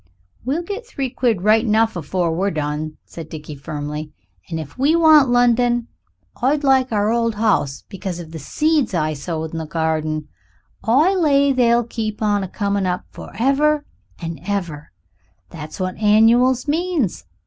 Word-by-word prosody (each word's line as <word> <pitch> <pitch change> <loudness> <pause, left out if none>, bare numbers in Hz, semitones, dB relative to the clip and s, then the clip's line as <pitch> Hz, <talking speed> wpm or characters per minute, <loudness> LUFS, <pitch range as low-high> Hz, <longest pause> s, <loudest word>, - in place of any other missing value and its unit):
"We'll 285 +8 -1
get 415 +6 -6
three 270 - -4
quid 230 -9 0
right 215 +2 +4
enough 225 -1 +2
afore 170 +1 -1
we 195 +4 0
done," 155 -1 -3
said 160 -2 -10
Dickie 155 -1 -8
firmly; 150 +1 -6 0.4
"and 160 - -3
if 155 -3 -8
you 305 +5 +3
want 310 -5 +6
London, 245 0 +2 0.5
I'd 285 +4 +1
like 265 -2 +3
our 210 0 +1
old 230 -1 0
house 195 -11 0
because 190 -3 -5
of 165 -2 -9
the 160 - -7
seeds 295 - 0
I 155 -2 0
sowed 160 +2 -4
in 165 - -4
the 160 - -5
garden; 155 -1 -1 0.6
I 285 - +4
lay 280 -6 +3
they'll 240 -2 +3
keep 220 -2 -4
on 205 -1 +2
a - - -4
coming 200 0 -1
up, 180 0 -2
forever 290 +4 0 0.3
and 165 -3 -6
ever. 170 - -4 0.6
That's 155 +2 -9
what 185 -1 -3
annuals 230 +5 +4
means. 315 - -1
215 Hz, 160 wpm, -20 LUFS, 160-260 Hz, 0.6 s, want